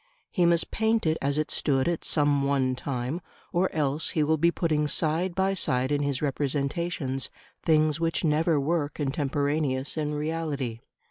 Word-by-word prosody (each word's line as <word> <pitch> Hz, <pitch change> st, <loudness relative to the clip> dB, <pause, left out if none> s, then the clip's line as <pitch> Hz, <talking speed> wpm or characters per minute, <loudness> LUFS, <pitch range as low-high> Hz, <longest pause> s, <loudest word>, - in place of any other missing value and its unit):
He 175 Hz, -4 st, +3 dB
must 170 Hz, -1 st, +2 dB
paint 220 Hz, -1 st, +1 dB
it 160 Hz, 0 st, +1 dB
as 140 Hz, +1 st, 0 dB
it 155 Hz, 0 st, -1 dB
stood 135 Hz, -1 st, +1 dB
at 170 Hz, -1 st, -1 dB
some 145 Hz, -2 st, +2 dB
one 135 Hz, -2 st, +1 dB
time, 130 Hz, +5 st, -3 dB, 0.3 s
or 180 Hz, +2 st, +2 dB
else 150 Hz, 0 st, 0 dB
he 155 Hz, -, +1 dB
will 160 Hz, +1 st, +2 dB
be 170 Hz, +2 st, +5 dB
putting 155 Hz, -3 st, 0 dB
side 165 Hz, +4 st, 0 dB
by 190 Hz, +1 st, +2 dB
side 130 Hz, -7 st, 0 dB
in 145 Hz, 0 st, +1 dB
his 140 Hz, -1 st, -1 dB
representations 140 Hz, 0 st, -1 dB, 0.3 s
things 155 Hz, -1 st, +3 dB
which 165 Hz, 0 st, 0 dB
never 160 Hz, 0 st, +2 dB
were 150 Hz, +1 st, 0 dB
contemporaneous 145 Hz, -1 st, -1 dB
in 150 Hz, -1 st, -1 dB
reality. 150 Hz, -6 st, -2 dB
150 Hz, 160 wpm, -27 LUFS, 140-165 Hz, 0.3 s, be